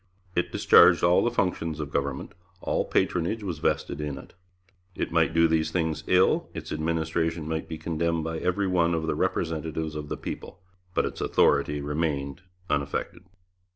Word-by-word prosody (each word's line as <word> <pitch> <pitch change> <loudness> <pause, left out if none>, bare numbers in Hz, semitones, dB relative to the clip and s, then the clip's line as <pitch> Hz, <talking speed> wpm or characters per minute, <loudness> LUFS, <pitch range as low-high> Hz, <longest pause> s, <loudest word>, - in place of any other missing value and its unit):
It 90 0 0
discharged - - +6
all 85 +1 +5
the 120 - +2
functions 90 -8 -1
of 75 -2 -4
government; 70 -1 -2 0.3
all - - -1
patronage 90 +6 0
was 85 -6 -4
vested 75 - -1
in 75 -2 -4
it. - - -12 0.6
It - - -3
might 80 -1 +3
do 85 0 +4
these 80 -1 +1
things 80 -2 -1
ill; 90 +1 +3
its - - -6
administration 80 0 -1
might 80 0 -3
be 80 - -4
condemned 85 0 -1
by 80 0 -3
every 90 +3 0
one 85 -2 +2
of 80 -1 -2
the - - 0
representatives 80 -1 -2
of 75 -1 -6
the - - -3
people; 90 - -7 0.4
but - - +2
its - - -5
authority 75 0 +2
remained 75 -1 -2 0.3
unaffected. 85 +5 -2
80 Hz, 165 wpm, -26 LUFS, 75-85 Hz, 0.6 s, discharged